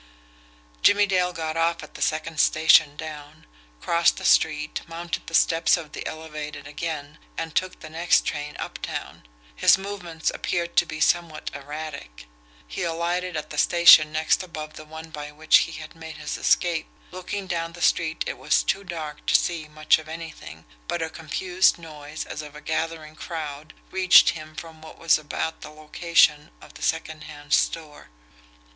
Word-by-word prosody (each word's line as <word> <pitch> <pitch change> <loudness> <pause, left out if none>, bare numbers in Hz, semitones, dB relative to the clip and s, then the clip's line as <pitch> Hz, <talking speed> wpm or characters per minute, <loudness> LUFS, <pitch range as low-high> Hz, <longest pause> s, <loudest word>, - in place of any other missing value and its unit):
Jimmie 205 0 +5
Dale 180 -2 +1
got 160 -2 -4
off 165 0 0
at 150 - -12
the - - -10
second 155 0 -1
station 155 -2 +5
down, 150 0 -9 0.3
crossed 170 - +2
the - - -6
street, 150 -1 +2
mounted 170 +1 -5
the - - -3
steps 165 +1 +4
of 160 -3 -9
the - - -6
elevated 150 -2 -7
again, 150 0 -5 0.2
and 165 -1 -4
took 185 0 -1
the 155 - -9
next 170 +2 +2
train 150 0 -4
uptown. - - -6 0.3
His - - +5
movements 185 -5 -4
appeared 170 -1 -3
to - - +5
be 155 0 -6
somewhat 165 -2 +1
erratic 145 - -8 0.4
he - - -6
alighted 170 +1 -1
at 155 0 -6
the 150 - -2
station 170 -3 +7
next 155 +3 +1
above 155 -4 -7
the 155 - -11
one 160 +1 -10
by 150 -1 -7
which 155 +1 +5
he - - -9
had 155 -1 -9
made 160 -1 -9
his 150 - -4
escape. 170 -3 +1 0.2
Looking 185 +2 -5
down 170 -2 -3
the 175 - -11
street 160 -1 +1
it - - -5
was 150 +4 +2
too 200 - -1
dark 155 -5 -7
to - - +3
see 165 -3 +1
much 155 +1 +2
of 155 0 -12
anything, 160 - -9 0.2
but 170 - -2
a 160 - -4
confused 180 +4 +1
noise 155 -2 -8
as 150 - -6
of 150 -1 -11
a - - -8
gathering 160 0 -3
crowd 155 -2 -7 0.2
reached 185 -1 +6
him 155 -1 -10
from 160 -1 -10
what 160 - -12
was 165 -2 +3
about 155 +1 -4
the - - -8
location 155 0 +2
of - - -15
the - - -13
secondhand 150 -1 -3
store. 155 -3 0
160 Hz, 170 wpm, -24 LUFS, 150-170 Hz, 0.4 s, station